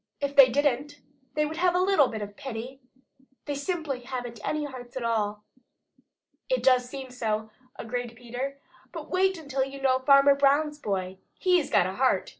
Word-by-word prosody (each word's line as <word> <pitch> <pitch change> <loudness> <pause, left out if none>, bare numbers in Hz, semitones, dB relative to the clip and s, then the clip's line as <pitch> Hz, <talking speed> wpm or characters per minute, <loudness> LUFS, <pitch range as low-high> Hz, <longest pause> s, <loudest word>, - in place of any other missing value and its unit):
If 280 0 -3
they 275 -2 +9
didn't, 285 +2 0 0.4
they 300 0 +2
would 315 +1 -5
have 360 0 +2
a - - +3
little 370 -7 +4
bit 220 -3 -5
of 205 0 -9
pity. 255 +2 -7 0.7
They 290 - -3
simply 285 -2 -3
haven't 245 -2 -6
any 305 -1 -1
hearts 255 -3 -9
at 255 - -3
all." 210 -2 -1 1.1
"It - - 0
does 250 -2 +4
seem 265 -1 -7
so," 220 -3 -2 0.2
agreed 240 0 -5
Peter. 245 +4 -5 0.3
"But - - -8
wait 380 0 +2
until 280 -4 -2
you 270 +1 -7
know 260 -1 +2
Farmer 275 +1 +6
Brown's 285 +2 +2
boy! 190 -6 -3 0.2
HE'S 360 -4 +2
got - - +4
a 185 - -3
heart!" 260 +4 +1
265 Hz, 175 wpm, -27 LUFS, 240-290 Hz, 1.1 s, they